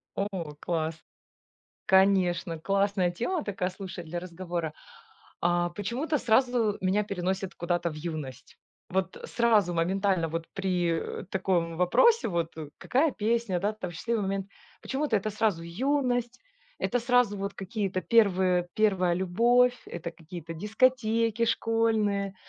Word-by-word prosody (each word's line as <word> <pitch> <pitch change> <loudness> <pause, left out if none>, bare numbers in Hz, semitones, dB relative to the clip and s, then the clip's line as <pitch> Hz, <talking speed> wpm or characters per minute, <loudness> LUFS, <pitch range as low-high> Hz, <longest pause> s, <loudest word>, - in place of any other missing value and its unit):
О, 190 -7 -3
класс. 160 -1 -2 0.9
Конечно, 185 -3 +3
классная 195 0 +1
тема 290 - -2
такая, 190 -3 -2
слушай, 185 -2 -8
для 170 +2 -5
разговора. 170 -2 -4 0.7
А 175 0 +1
почему-то 240 - -2
сразу 240 -3 +2
меня 190 +3 +2
переносит 190 -1 -3
куда-то 175 0 -1
в 155 - -8
юность. 155 -5 -7 0.3
Вот 190 0 -1
сразу 220 -6 +2
моментально, 185 0 +1
вот 165 +1 -4
при, 180 -4 -1
э, - - -10
таком 175 -3 0
вопросе, 450 - +4
вот 170 -4 -2
э: 155 -2 -6
"Какая 285 +4 +2
песня, 220 -4 0
да, 205 +4 0
там 210 -4 -6
счастливый 215 +6 -2
момент?" 195 0 -2 0.3
Почему-то 270 -3 0
это 210 +2 -1
сразу 210 -5 0
юность, 245 +5 -1 0.4
это 245 - 0
сразу 245 -3 +3
вот 200 0 -4
какие-то 195 -1 -3
первые 185 -5 +3
первая 190 -5 +2
любовь, 235 +8 +3
это 170 0 -6
какие-то 165 0 -9
дискотеки 225 +3 +1
школьные, 220 -4 +1
195 Hz, 130 wpm, -28 LUFS, 175-225 Hz, 0.9 s, вопросе